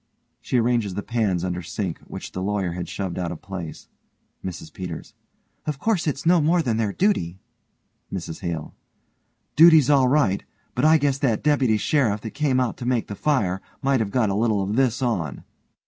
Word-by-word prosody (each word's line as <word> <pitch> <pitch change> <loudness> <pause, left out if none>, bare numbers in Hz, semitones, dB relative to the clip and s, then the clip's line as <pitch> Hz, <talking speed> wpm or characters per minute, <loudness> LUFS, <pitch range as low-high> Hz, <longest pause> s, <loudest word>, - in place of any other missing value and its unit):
(She 130 - 0
arranges 115 -5 +1
the 100 - -3
pans 105 -7 0
under 90 -1 -2
sink 90 +1 -4
which - - -7
the 95 - -5
LAWYER 100 -2 -1
had 90 0 -5
shoved 95 -3 -4
out 85 -1 -2
of 85 - -8
place.) 90 -5 -7 0.6
MRS 85 -4 -7
PETERS: 90 -4 -7 0.5
Of 150 -2 -1
course 195 0 0
it's 145 0 -2
no 170 0 +5
more 165 +3 +3
than 115 -5 0
their 110 -3 0
duty. 95 - 0 0.7
MRS 80 -4 -5
HALE: 85 -4 -4 0.8
Duty's 160 -3 +7
all 135 -3 +5
right, 125 -8 +2 0.3
but 125 - +1
I 160 +1 +7
guess 140 -2 0
that 120 -6 +1
deputy 135 -7 +3
sheriff 110 -3 +1
that 110 - -6
came 140 -3 +1
out 125 -2 -1
to 125 - -6
make 125 -3 0
the 100 - -4
fire 100 -10 0 0.2
might 135 -1 +3
have 110 -3 -1
got 110 -2 +1
a - - -1
little 105 -2 +1
of 100 +3 -2
this 130 0 +1
on. 90 - -2
110 Hz, 190 wpm, -24 LUFS, 95-140 Hz, 0.8 s, Duty's